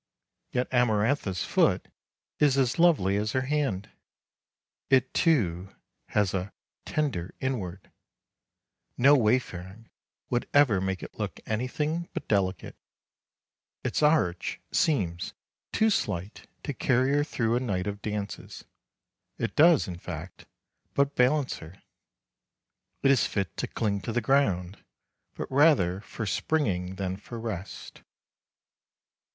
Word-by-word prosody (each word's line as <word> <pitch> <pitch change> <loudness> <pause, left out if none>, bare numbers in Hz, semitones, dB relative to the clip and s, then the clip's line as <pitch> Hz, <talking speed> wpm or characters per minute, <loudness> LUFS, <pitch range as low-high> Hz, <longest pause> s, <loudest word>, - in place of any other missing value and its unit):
Yet 125 - 0
Amarantha's 110 - +1
foot - - +2 0.5
is 140 -2 +4
as 130 +2 +1
lovely 140 - +4
as 105 +2 -1
her 130 - +2
hand. 130 -8 -1 1.0
It, 130 -1 +3
too, 100 - +1 0.3
has 105 -3 +1
a 95 +1 -2 0.4
"tender 130 - -2
inward"; 100 -9 -4 1.1
no 140 +4 +7
wayfaring 110 -4 -1 0.4
would 120 - 0
ever 125 -10 +5
make 95 -1 -2
it - - -10
look - - -3
anything 150 +9 -2
but - - -4
delicate; 95 -4 0 1.1
its - - -1
arch 150 - +2
seems 100 - 0 0.4
too 220 0 +3
slight 95 - -2 0.2
to 145 - -3
carry 130 +1 +2
her 145 +1 +3
through 115 -6 0
a - - +2
night 100 -8 -2
of 100 0 -4
dances; 105 -1 -5 0.7
it - - -3
does, 160 -1 +6
in 90 -2 -6
fact, 85 0 -8 0.5
but 140 0 +2
balance 130 +2 +2
her. 85 +3 -12 1.2
It 135 - +6
is 135 - +3
fit 95 -5 -3
to - - -2
cling 100 -3 -1
to 95 - -4
the 120 - +1
ground, 100 -7 +1 0.5
but - - -4
rather 130 - +4
for 110 +1 -6
springing 95 - -1
than 95 -1 -3
for 115 +3 -8
rest. 105 -4 -6
110 Hz, 125 wpm, -28 LUFS, 95-140 Hz, 1.2 s, no